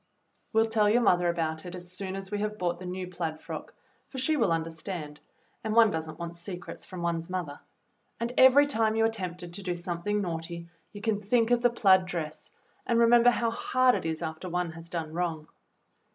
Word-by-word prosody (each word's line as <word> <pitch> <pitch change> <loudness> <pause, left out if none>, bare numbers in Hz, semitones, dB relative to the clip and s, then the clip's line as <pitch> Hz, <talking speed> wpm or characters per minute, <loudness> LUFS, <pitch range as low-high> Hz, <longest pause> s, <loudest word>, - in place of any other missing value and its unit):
We'll 220 0 +4
tell 220 -2 +2
your 240 +3 +4
mother 180 -4 +4
all - - +3
about 160 -2 -2
it 180 0 -7
as 175 0 -9
soon 190 +1 -5
as 195 0 -7
we 205 - -1
have 210 0 -2
bought 175 -2 -1
the 185 - -7
new 185 +1 -4
plaid 170 -3 -4
frock, - - -8 0.3
for 270 - -9
she 265 +5 +2
will 230 - +2
understand, 165 -1 -3 0.4
and 220 -1 -1
one 230 -2 +7
does 160 0 -3
n't - - -9
want 170 0 -6
secrets 180 0 -7
from 185 -2 -6
one's 165 -1 -1
mother; 175 -6 -4 0.6
and 235 +1 -2
every 265 +2 +7
time 225 -6 +1
you 225 0 +3
are - - +4
tempted 180 -5 -5
to 200 - -6
do 180 -2 -2
something 175 +4 -2
naughty 170 -2 -4 0.2
you 205 - -9
can 215 -2 0
think 230 +3 +2
of 240 -1 +4
the 245 - +5
plaid 190 -6 +4
dress, 155 -3 -4 0.4
and 235 - +2
re 235 - +6
member 240 +1 +6
how 235 -1 +1
hard 255 +2 +3
it - - -2
is 160 +1 -3
after 160 +3 -5
one 175 -1 -1
has 165 +1 -10
done 165 -2 -4
wrong. 165 -3 -2
180 Hz, 220 wpm, -28 LUFS, 170-220 Hz, 0.6 s, one